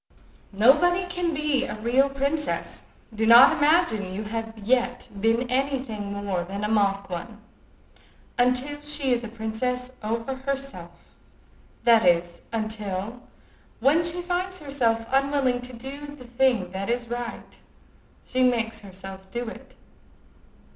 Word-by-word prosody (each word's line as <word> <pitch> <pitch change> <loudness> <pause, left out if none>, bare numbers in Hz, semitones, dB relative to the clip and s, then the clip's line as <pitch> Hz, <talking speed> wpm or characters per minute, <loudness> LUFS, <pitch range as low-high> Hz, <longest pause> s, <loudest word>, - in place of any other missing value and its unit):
"Nobody 345 - +4
can 355 -1 -2
be 300 -3 +1
a 270 - -5
real 250 +5 +3
princess—do 270 - -3
not 235 +3 +9
imagine 290 - +2
you 200 +3 -4
have 225 +1 -5
yet 245 +3 0
been 230 +3 +2
any 270 +2 +1
thing 215 -6 -6
more 200 -3 -2
than 195 +3 -6
a - - +1
mock 200 -2 +1
one—until 245 +7 -4
she 295 -3 0
is 240 0 -1
a - - -4
princess 235 +3 -3
over 230 +4 -2
herself, 265 -11 -6 0.7
that 230 -2 +6
is, 175 -1 +2
until, 215 0 -4 0.6
when 285 +8 +4
she 340 +1 0
finds 365 +1 -2
herself 245 -7 0
unwilling 270 -2 +2
to 250 0 -8
do 270 +5 -7
the 255 -3 -12
thing 240 -6 +1
that 195 +2 -4
is 240 0 -1
right, 240 0 -6 0.7
she 255 - -1
makes 230 -3 +1
herself 190 -1 -10
do 240 +4 -4
it. 260 +3 -12
240 Hz, 130 wpm, -25 LUFS, 215-275 Hz, 0.7 s, not